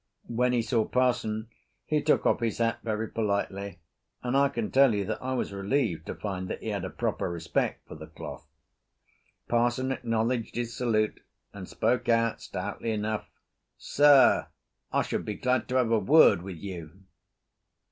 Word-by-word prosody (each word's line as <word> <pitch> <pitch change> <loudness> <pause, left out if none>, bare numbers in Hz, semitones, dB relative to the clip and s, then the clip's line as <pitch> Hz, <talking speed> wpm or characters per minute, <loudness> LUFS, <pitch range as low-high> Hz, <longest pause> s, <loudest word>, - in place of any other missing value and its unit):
When 125 +2 +1
he 120 -2 +1
saw 115 -1 +1
parson 110 -3 0 0.4
he 150 -1 +1
took 150 - +2
off - - +3
his 115 -3 -1
hat 115 -1 0
very 110 0 -2
politely 100 -3 -2 0.5
and 125 +1 -1
I 140 0 +4
can 115 -4 -3
tell 135 -4 +5
you 100 -1 -1
that 110 +2 -4
I 130 0 -2
was 120 - -2
relieved 100 - -1
to - - -4
find 95 -3 -4
that - - -6
he - - -3
had - - -2
a - - -3
proper - - -2
respect 85 -1 -2
for - - -9
the - - -10
cloth. - - -9 1.0
Parson 120 +2 +1
acknowledged 115 -1 -1
his 120 -1 -3
salute 110 -3 0 0.3
and 95 -2 -9
spoke 120 +2 0
out 115 -1 +2
stoutly 115 - -5
enough. 110 0 -2 0.5
"Sir, 145 -2 +5 0.4
I - - +2
should - - -3
be 105 - -4
glad 125 +3 0
to 125 - -3
have 125 -3 +2
a 115 - +4
word 105 - +6
with 95 -1 -7
you." 90 0 -8
115 Hz, 170 wpm, -28 LUFS, 100-125 Hz, 1.0 s, word